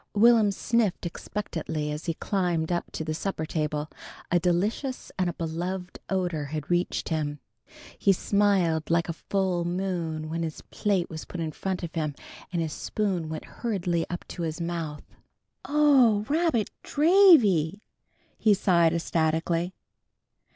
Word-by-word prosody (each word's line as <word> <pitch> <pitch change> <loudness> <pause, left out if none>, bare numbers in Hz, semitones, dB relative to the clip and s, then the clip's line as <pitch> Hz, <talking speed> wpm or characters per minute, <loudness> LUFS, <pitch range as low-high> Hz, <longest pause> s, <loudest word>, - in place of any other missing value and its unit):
Will'm 225 0 +6
sniffed 215 -2 0
expectantly 165 -4 -4
as 150 +1 -5
he 165 - -1
climbed 175 -5 -1
up 175 - -2
to - - -3
the 155 - -2
supper 160 -1 -3
table. 150 -1 -2 0.4
A 175 - +4
delicious 200 - -1
and 180 -1 +2
a - - -3
beloved 180 +3 -4
odor 180 -6 -1
had 150 +2 -5
reached 175 +1 0
him. 150 -2 -2 0.6
He 195 - +4
smiled 190 -5 +2
like 170 0 +2
a - - -1
full 185 0 -1
moon 170 -3 -2
when 165 +1 -3
his 160 -2 -4
plate 195 -4 +1
was 160 -1 -6
put 180 - -7
in 160 -1 -2
front 185 +3 -3
of 170 - -5
him, 155 -3 -2 0.4
and 170 -2 0
his 155 -2 -3
spoon 190 -7 -2
went 160 0 -5
hurriedly 180 -7 -2
up 175 - -5
to 175 - -6
his 160 -1 -3
mouth. 165 -3 -4 0.6
"Oh, 270 -8 +4
rabbit 300 -7 +1
dravy!" 285 - +5 0.6
he 215 -2 +5
sighed 170 -4 +3
ecstatically. 165 +2 0
175 Hz, 145 wpm, -27 LUFS, 160-200 Hz, 0.6 s, Will'm